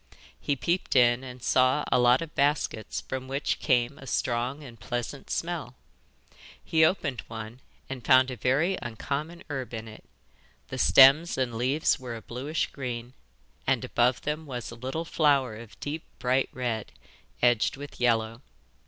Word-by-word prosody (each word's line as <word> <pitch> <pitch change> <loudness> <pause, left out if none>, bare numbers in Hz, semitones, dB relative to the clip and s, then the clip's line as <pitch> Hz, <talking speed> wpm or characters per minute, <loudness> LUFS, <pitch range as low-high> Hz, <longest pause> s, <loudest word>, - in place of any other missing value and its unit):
He 145 - 0
peeped 170 +6 -1
in 120 0 +5
and 125 -1 -9
saw 130 +3 +3
a - - +4
lot 125 +4 +4
of 160 - -10
baskets 110 - 0
from 130 +8 -5
which 135 +2 -1
came 125 -1 +1
a 135 - -11
strong 125 +5 -1
and 120 -5 -12
pleasant 120 +4 -5
smell. 165 -8 -3 0.9
He 160 -1 +3
opened 155 -6 +1
one 110 +2 -8 0.3
and 130 -3 -6
found 130 +2 +5
a - - -4
very 135 - +1
uncommon 140 +8 -4
herb 135 -5 -4
in 110 0 -6
it. 110 - -12 0.7
The 130 - -5
stems 140 +8 +7
and 130 -3 -1
leaves 130 +7 +1
were 125 -2 -6
a 115 - -8
bluish 140 +6 -2
green, 125 -2 -5 0.5
and - - +2
above 125 +1 +1
them 150 +1 -3
was 125 -4 -5
a - - -8
little 130 +8 -4
flower 140 -8 +2
of 115 -1 -11
a - - -19
deep 155 +2 -4
bright 130 +1 +1
red, 120 -4 -3 0.5
edged 120 0 +3
with 145 +1 -9
yellow. 115 -1 +1
130 Hz, 160 wpm, -27 LUFS, 120-145 Hz, 0.9 s, stems